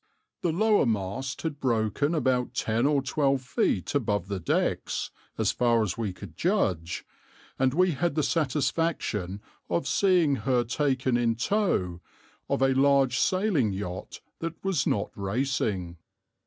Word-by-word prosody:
The 170 - +1
lower 210 - +3
mast 110 +5 -2
had 155 -3 -3
broken 120 - +1
about 130 -5 0
ten 115 +4 +1
or 145 -2 +2
twelve 135 -1 +1
feet 100 -6 0
above 105 -8 0
the 100 -2 -2
decks, 85 - -1 0.3
as - - +2
far 120 -2 +2
as 95 -4 -2
we 110 -4 -2
could 90 -3 -11
judge, 95 - 0 0.5
and 130 0 +3
we 185 +1 +4
had 160 +2 -1
the 155 - +1
satisfaction 140 - -1 0.3
of 170 - 0
seeing 175 -8 +3
her 125 +2 +1
taken 130 0 0
in 115 -1 +1
tow 115 - 0 0.5
of - - +1
a 135 0 +4
large 135 -2 +3
sailing 185 - +2
yacht 95 -2 -6 0.2
that 165 0 -4
was 185 -8 0
not 100 - 0
racing. 100 -5 -1
130 Hz, 140 wpm, -27 LUFS, 105-150 Hz, 0.5 s, we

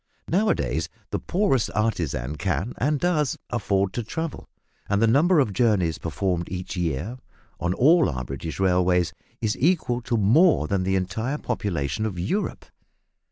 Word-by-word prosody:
Now 205 +6 +2
a - - +4
days 70 +5 -2 0.2
the - - -1
poorest 175 - +1
artisan 80 - -1
can, 95 - -2
and 145 +3 +1
does, 155 -6 +1
afford 100 -4 0
to 120 - -2
travel, 160 +8 -5 0.4
and 100 0 +2
the 115 - +4
number 150 +9 +4
of 110 -8 +1
journeys 95 -7 +2
performed 85 +2 -2
each 90 +1 -5
year 90 - -2 0.4
on 90 +2 -1
all 160 - +5
our 65 -2 -4
British 70 +7 -6
railways 90 -2 +2 0.3
is 110 -1 0
equal 145 -6 +1
to 115 0 -1
more 120 - +4
than 100 +1 0
the 95 +1 0
entire 110 +9 -1
population 100 - -2
of 95 -4 -6
Europe! 105 - -2
100 Hz, 160 wpm, -24 LUFS, 90-130 Hz, 0.4 s, all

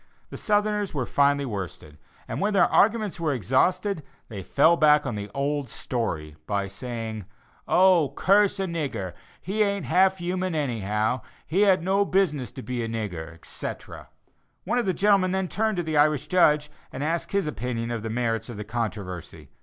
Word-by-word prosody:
The - - -7
Southerners 210 -3 0
were 130 -3 -1
finally 140 +1 +2
worsted, 90 - -6 0.3
and - - -4
when 205 +1 +1
their 180 - +6
arguments 210 -3 +2
were 160 -3 0
exhausted, 165 - +1 0.3
they 105 -4 -6
fell 150 - +4
back 150 -2 +4
on 120 - -2
the 105 0 -5
old 140 -1 -1
story, 80 - -3
by 100 -1 0
saying: 110 +1 -6 0.4
"Oh! 180 -5 +4
curse 200 +1 +3
a 195 - 0
nigger, 135 - -3 0.3
he 205 +4 -2
ain't 200 -5 +1
half 190 +8 +3
human 180 0 -2
anyhow; 110 -4 -1 0.2
he 185 +6 +1
had 190 -5 +4
no 195 +2 +2
business 180 -10 0
to 130 - -8
be 125 -1 -3
a 115 - -2
nigger, 95 -8 -4
etc." 85 - -7 0.5
One 245 - 0
of 235 - -1
the 185 - +2
gentlemen 195 -2 +3
then 190 -1 0
turned 220 +1 -1
to 175 - 0
the 160 -2 -1
Irish 150 -1 +3
judge, 150 -3 +3 0.2
and 130 - -5
asked 165 +2 -2
his 200 -1 +1
opinion 120 -3 -3
of 115 -2 -3
the 110 - -4
merits 115 0 -1
of 120 - -7
the 105 - -4
controversy. 105 -6 -5
145 Hz, 175 wpm, -25 LUFS, 115-185 Hz, 0.5 s, their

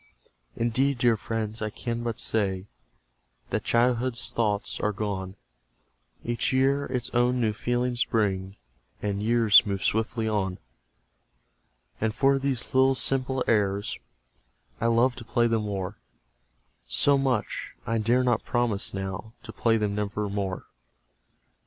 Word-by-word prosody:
"Indeed, 130 +4 +1
dear 120 -1 +3
friends, 110 0 -4
I 110 - -1
can 115 +2 -4
but 115 -2 -3
say 95 -4 0 0.9
That - - -1
childhood's 120 0 +1
thoughts 105 -3 0
are 105 - 0
gone; 95 -2 -4 0.9
Each 120 0 0
year 135 +2 +2
its 125 -2 -2
own 125 +1 +2
new 110 -3 +1
feelings 120 +2 0
brings, 95 -3 -1 0.5
And 100 -1 -1
years 115 -1 +6
move 100 -2 -3
swiftly 110 +1 0
on: 95 -4 -1 1.4
"And 110 -1 -1
for 135 0 +3
these 135 -3 -1
little 130 0 +4
simple 130 0 +2
airs 100 -2 0 0.8
I 115 - +1
love 120 +2 +3
to 120 - -8
play 120 +1 +1
them 115 -2 0
o'er 100 0 -4 0.9
So 140 - +3
much 130 -6 -1
I 115 0 0
dare 120 +4 +2
not 120 -3 +1
promise, 120 -6 -1
now, 95 +3 -5
To - - -9
play 115 -1 +2
them 105 -2 -1
never 105 0 -2
more." 100 -2 -3
115 Hz, 135 wpm, -26 LUFS, 105-120 Hz, 1.4 s, years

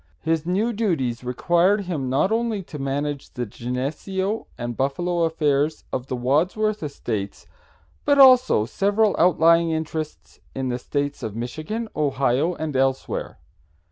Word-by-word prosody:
His 160 0 0
new 210 +6 +1
duties 150 - -1
required 175 - +2
him 160 -9 -3
not 140 +10 +2
only 225 -3 0
to 150 -3 -9
manage 140 +1 -3
the 125 -1 -3
Geneseo 150 - -3
and 120 -1 -4
Buffalo 170 +7 0
affairs 150 -1 0
of 130 0 -3
the 130 - -2
Wadsworth 180 - +1
estates, 110 -9 -4 0.6
but 285 -1 +3
also 255 - +6
several 205 - +1
outlying 170 -1 +4
interests 160 -1 -4 0.2
in 130 -1 -2
the 125 0 -2
States 145 +2 -3
of 110 -2 -5
Michigan, 155 - -4
Ohio 140 +2 +1
and 155 -3 -4
elsewhere. 135 0 -1
155 Hz, 135 wpm, -23 LUFS, 130-190 Hz, 0.6 s, also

